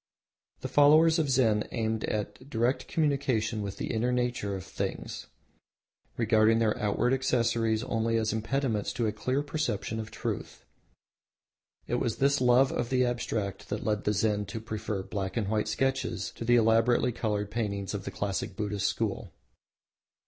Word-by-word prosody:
The -, -, -3 dB
followers 155 Hz, +3 st, +5 dB
of 155 Hz, -3 st, +1 dB
Zen 115 Hz, -5 st, +2 dB
aimed 110 Hz, -1 st, -1 dB
at 105 Hz, +5 st, -4 dB
direct 120 Hz, +1 st, 0 dB
communion 135 Hz, -8 st, 0 dB
with 100 Hz, -1 st, -5 dB
the -, -, -3 dB
inner 120 Hz, +2 st, +1 dB
nature 120 Hz, -5 st, -1 dB
of 95 Hz, -, -6 dB
things, -, -, -5 dB, 0.9 s
regarding 110 Hz, -1 st, +4 dB
their 110 Hz, -2 st, +2 dB
outward 105 Hz, +4 st, +1 dB
accessories 115 Hz, -3 st, +1 dB
only 115 Hz, -1 st, 0 dB
as 110 Hz, -1 st, 0 dB
impediments 110 Hz, -1 st, -1 dB
to 120 Hz, -, -1 dB
a 110 Hz, -, +1 dB
clear 130 Hz, +6 st, -1 dB
perception 140 Hz, -7 st, -2 dB
of 110 Hz, -1 st, -5 dB
Truth. -, -, -5 dB, 1.2 s
It -, -, -1 dB
was 115 Hz, -, -1 dB
this 140 Hz, 0 st, +2 dB
love 125 Hz, +2 st, +5 dB
of 120 Hz, -, -2 dB
the 125 Hz, -1 st, +3 dB
Abstract 115 Hz, -5 st, -3 dB
that 105 Hz, -, -3 dB
led 105 Hz, -1 st, 0 dB
the 105 Hz, -, +2 dB
Zen 105 Hz, -1 st, 0 dB
to 100 Hz, +4 st, -5 dB
prefer 110 Hz, -3 st, -4 dB
black 95 Hz, 0 st, -4 dB
and 105 Hz, -4 st, 0 dB
white 105 Hz, -1 st, 0 dB
sketches 135 Hz, 0 st, -1 dB
to -, -, -8 dB
the 120 Hz, +1 st, +4 dB
elaborately 115 Hz, +2 st, +3 dB
coloured 105 Hz, -3 st, -2 dB
paintings 100 Hz, -4 st, -2 dB
of 100 Hz, -2 st, -4 dB
the -, -, -4 dB
classic 100 Hz, -1 st, -3 dB
Buddhist 105 Hz, -2 st, -1 dB
School. -, -, -2 dB
115 Hz, 160 wpm, -29 LUFS, 105-125 Hz, 1.2 s, followers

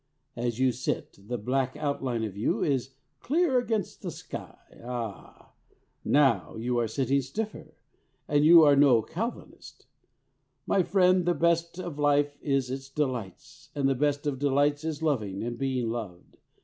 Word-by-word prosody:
As 120 Hz, -1 st, -2 dB
you 130 Hz, 0 st, +3 dB
sit, 125 Hz, -4 st, -4 dB
the 120 Hz, -, -2 dB
black 130 Hz, +5 st, -1 dB
outline 135 Hz, -6 st, -2 dB
of 105 Hz, -4 st, -4 dB
you 105 Hz, +2 st, 0 dB
is 135 Hz, -2 st, -1 dB, 0.2 s
clear 300 Hz, -, +2 dB
against 225 Hz, -5 st, -3 dB
the -, -, -4 dB
sky. -, -, -8 dB, 0.3 s
Ah! 120 Hz, -5 st, -7 dB, 0.5 s
now 145 Hz, -4 st, +2 dB
you 120 Hz, +2 st, -1 dB
are 115 Hz, -, 0 dB
sitting 135 Hz, +4 st, 0 dB
stiffer. 210 Hz, -, -6 dB, 0.5 s
But 145 Hz, 0 st, +2 dB
you 165 Hz, +2 st, +8 dB
are 145 Hz, -2 st, +6 dB
no 135 Hz, -5 st, +5 dB
Calvinist. 230 Hz, -, -7 dB, 0.8 s
My 195 Hz, -, +2 dB
friend, 185 Hz, -1 st, +3 dB
the 175 Hz, -, +3 dB
best 170 Hz, 0 st, +1 dB
of 175 Hz, -5 st, -6 dB
life 145 Hz, 0 st, +2 dB
is 135 Hz, -3 st, 0 dB
its 135 Hz, 0 st, -6 dB
delights, 130 Hz, -9 st, -4 dB
and 140 Hz, -2 st, +1 dB
the 135 Hz, -, +3 dB
best 145 Hz, +2 st, 0 dB
of 140 Hz, -3 st, -2 dB
delights 145 Hz, +1 st, +1 dB
is 160 Hz, -1 st, -4 dB
loving 110 Hz, -11 st, -1 dB
and 120 Hz, +1 st, -3 dB
being 130 Hz, -3 st, -1 dB
loved. 105 Hz, -7 st, -7 dB
140 Hz, 155 wpm, -28 LUFS, 120-155 Hz, 0.8 s, you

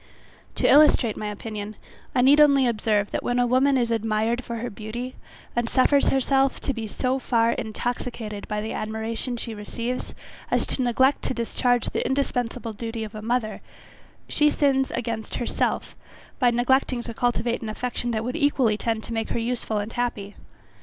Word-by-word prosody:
To -, -, +2 dB
illustrate 280 Hz, -7 st, +5 dB
my 215 Hz, -, -4 dB
opinion, 210 Hz, 0 st, -6 dB, 0.4 s
I 250 Hz, -, +4 dB
need 285 Hz, +3 st, +7 dB
only 280 Hz, -3 st, +6 dB
observe, 210 Hz, -3 st, +1 dB
that -, -, -1 dB
when 245 Hz, -, -1 dB
a 245 Hz, -, +3 dB
woman 260 Hz, +3 st, +3 dB
is 235 Hz, -2 st, +1 dB
admired 225 Hz, +2 st, 0 dB
for 235 Hz, -, -5 dB
her 235 Hz, +2 st, -4 dB
beauty, 235 Hz, +5 st, -6 dB, 0.4 s
and 240 Hz, -1 st, 0 dB
suffers 275 Hz, +2 st, +4 dB
herself 270 Hz, 0 st, +2 dB
to 275 Hz, -, -1 dB
be 225 Hz, -2 st, -4 dB
so 255 Hz, +5 st, -1 dB
far 230 Hz, -2 st, +2 dB
intoxicated 220 Hz, -2 st, -4 dB
by 210 Hz, -1 st, -2 dB
the 220 Hz, -, -4 dB
admiration 220 Hz, +3 st, -3 dB
she 230 Hz, -1 st, -5 dB
receives, 230 Hz, +4 st, -5 dB, 0.3 s
as -, -, +1 dB
to -, -, -2 dB
neglect 260 Hz, +3 st, +3 dB
to -, -, -1 dB
discharge 245 Hz, 0 st, +1 dB
the -, -, -1 dB
indispensable 245 Hz, -3 st, -1 dB
duty 225 Hz, +1 st, -4 dB
of 215 Hz, 0 st, -7 dB
a 215 Hz, -, -6 dB
mother, 225 Hz, -1 st, -1 dB, 0.7 s
she 300 Hz, 0 st, +3 dB
sins 270 Hz, -2 st, +2 dB
against 225 Hz, -2 st, -4 dB
herself 240 Hz, -, -1 dB, 0.4 s
by 250 Hz, -3 st, +5 dB
neglecting 245 Hz, +1 st, +2 dB
to 230 Hz, -, -6 dB
cultivate 240 Hz, 0 st, 0 dB
an 225 Hz, -, -4 dB
affection 245 Hz, +2 st, -3 dB
that 220 Hz, -2 st, -1 dB
would 250 Hz, +3 st, -3 dB
equally 275 Hz, -8 st, +2 dB
tend 225 Hz, 0 st, -2 dB
to 235 Hz, -, -6 dB
make 225 Hz, -1 st, -2 dB
her -, -, -1 dB
useful 230 Hz, -2 st, -2 dB
and 210 Hz, +2 st, -3 dB
happy. 215 Hz, -4 st, -2 dB
235 Hz, 175 wpm, -25 LUFS, 220-255 Hz, 0.7 s, need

